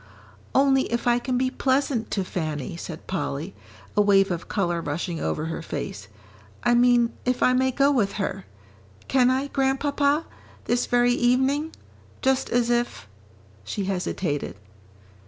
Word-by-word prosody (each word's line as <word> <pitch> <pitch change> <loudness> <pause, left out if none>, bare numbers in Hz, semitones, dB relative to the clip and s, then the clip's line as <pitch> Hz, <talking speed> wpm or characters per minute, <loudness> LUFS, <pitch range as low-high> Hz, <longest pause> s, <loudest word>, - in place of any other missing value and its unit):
"Only 270 -1 +3
if 235 +1 -1
I 240 0 +3
can 250 0 -1
be 255 0 +1
pleasant 260 -4 0
to 195 - -1
Fanny," 155 -6 -4
said 170 -1 -8
Polly, 170 -1 -3 0.4
a 210 - +5
wave 195 -1 +4
of 175 -1 -4
colour 175 -4 -1
rushing 165 +2 -3
over 155 - -2
her 165 +1 -4
face. 100 -10 -5 0.6
"I 240 - +3
mean 240 -1 +4
if 250 0 0
I 255 - +5
may 260 +1 +3
go 275 +2 +3
with 210 -8 +1
her? 195 -1 -3 0.6
Can 255 -2 +4
I, 260 +2 +1
Grandpapa, 280 +2 +1 0.4
this 240 0 +1
very 245 0 +3
evening, 265 +6 +2 0.5
just 265 0 +2
as 240 0 +1
if 240 - -1 0.3
" 100 +1 -28
she 195 - -3
hesitated. 180 - -2
240 Hz, 150 wpm, -25 LUFS, 180-260 Hz, 0.6 s, a